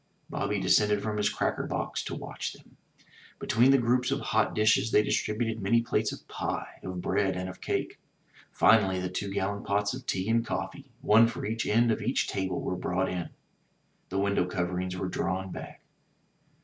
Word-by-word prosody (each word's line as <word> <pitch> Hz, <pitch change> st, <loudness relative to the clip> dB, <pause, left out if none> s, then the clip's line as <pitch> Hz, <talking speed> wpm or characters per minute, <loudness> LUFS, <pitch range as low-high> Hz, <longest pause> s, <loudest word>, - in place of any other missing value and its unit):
Bobby 100 Hz, 0 st, -1 dB
descended 105 Hz, +2 st, +3 dB
from 110 Hz, -1 st, -2 dB
his 105 Hz, 0 st, +2 dB
cracker -, -, -1 dB
box -, -, -2 dB
to -, -, -4 dB
watch -, -, -5 dB
them. -, -, -19 dB, 0.6 s
Between 120 Hz, +4 st, +3 dB
the 135 Hz, -, +7 dB
groups 125 Hz, 0 st, +2 dB
of 140 Hz, 0 st, 0 dB
hot 110 Hz, -5 st, +1 dB
dishes 110 Hz, 0 st, +3 dB
they 105 Hz, -, +4 dB
distributed 110 Hz, +1 st, -1 dB
many 115 Hz, +4 st, +3 dB
plates 120 Hz, -, 0 dB
of -, -, -10 dB
pie, -, -, -4 dB
of 90 Hz, -1 st, -5 dB
bread 95 Hz, -2 st, +1 dB
and 90 Hz, 0 st, -3 dB
of 95 Hz, 0 st, -9 dB
cake. -, -, -2 dB, 0.5 s
Finally 95 Hz, -4 st, +4 dB
the 90 Hz, 0 st, -2 dB
two 100 Hz, +2 st, -3 dB
gallon 100 Hz, +1 st, -2 dB
pots 100 Hz, +1 st, 0 dB
of 130 Hz, 0 st, -8 dB
tea 95 Hz, +1 st, -1 dB
and 115 Hz, +1 st, +2 dB
coffee, 95 Hz, +8 st, -5 dB
one 110 Hz, +2 st, +6 dB
for 115 Hz, -, -5 dB
each 115 Hz, +1 st, -2 dB
end 115 Hz, +2 st, +3 dB
of -, -, -1 dB
each 125 Hz, +5 st, 0 dB
table, 95 Hz, -2 st, -2 dB
were 90 Hz, -, -2 dB
brought 90 Hz, +1 st, -1 dB
in. 90 Hz, -2 st, -3 dB, 0.8 s
The 95 Hz, -, -3 dB
window 100 Hz, -2 st, +1 dB
cov 90 Hz, -1 st, -1 dB
erings 90 Hz, 0 st, -3 dB
were 95 Hz, +1 st, -3 dB
drawn 95 Hz, +1 st, -2 dB
back. -, -, -8 dB
100 Hz, 190 wpm, -29 LUFS, 95-115 Hz, 0.8 s, the